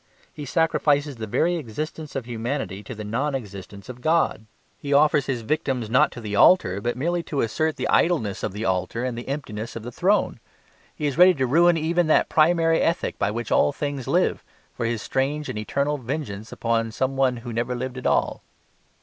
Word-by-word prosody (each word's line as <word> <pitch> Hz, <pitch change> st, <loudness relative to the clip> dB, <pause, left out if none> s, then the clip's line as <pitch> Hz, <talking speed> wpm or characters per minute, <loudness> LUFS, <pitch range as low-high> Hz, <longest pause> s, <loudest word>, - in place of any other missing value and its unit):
He 150 Hz, -, -7 dB
sacrifices 145 Hz, -2 st, +1 dB
the 110 Hz, -1 st, -5 dB
very 160 Hz, +11 st, +1 dB
existence 155 Hz, +3 st, -6 dB
of 135 Hz, -3 st, -3 dB
humanity 120 Hz, -3 st, -4 dB
to -, -, -7 dB
the 105 Hz, -, -7 dB
non 130 Hz, +7 st, -1 dB
existence 100 Hz, -4 st, -8 dB
of 125 Hz, -1 st, -9 dB
God. 155 Hz, -7 st, +1 dB, 0.3 s
He 140 Hz, 0 st, -2 dB
offers 150 Hz, -1 st, +4 dB
his 130 Hz, -4 st, -2 dB
victims 125 Hz, -4 st, -2 dB
not 125 Hz, -, +4 dB
to -, -, -8 dB
the 105 Hz, -2 st, -4 dB
altar, 100 Hz, -, +5 dB
but 120 Hz, +3 st, -2 dB
merely 170 Hz, +6 st, 0 dB
to 145 Hz, -4 st, -2 dB
assert 155 Hz, +8 st, 0 dB
the -, -, -3 dB
idleness 115 Hz, -, +1 dB
of -, -, -2 dB
the 105 Hz, +3 st, -5 dB
altar 95 Hz, +6 st, -1 dB
and 125 Hz, -2 st, -2 dB
the 120 Hz, -, -7 dB
emptiness 115 Hz, -6 st, -5 dB
of 115 Hz, -, -6 dB
the 120 Hz, -, -6 dB
throne. 195 Hz, -, +1 dB, 0.6 s
He 150 Hz, -, -4 dB
is 140 Hz, 0 st, -1 dB
ready 180 Hz, 0 st, +8 dB
to 130 Hz, -3 st, 0 dB
ruin 170 Hz, +6 st, +4 dB
even 170 Hz, +2 st, +1 dB
that 155 Hz, -, +3 dB
primary 165 Hz, +1 st, +3 dB
ethic 165 Hz, -, -1 dB
by 100 Hz, -, +1 dB
which 115 Hz, +1 st, -4 dB
all -, -, +4 dB
things 140 Hz, -2 st, -4 dB
live, -, -, +1 dB, 0.3 s
for 115 Hz, -, -2 dB
his 115 Hz, -2 st, -2 dB
strange 145 Hz, +3 st, -1 dB
and 105 Hz, -, -4 dB
eternal 140 Hz, +7 st, -1 dB
vengeance 120 Hz, -5 st, -5 dB
upon 115 Hz, -1 st, -1 dB
some 130 Hz, +4 st, -1 dB
one 130 Hz, -2 st, +2 dB
who 120 Hz, -, -5 dB
never 120 Hz, +2 st, -1 dB
lived 130 Hz, +1 st, -4 dB
at -, -, -2 dB
all. -, -, +1 dB
130 Hz, 200 wpm, -24 LUFS, 115-155 Hz, 0.6 s, ready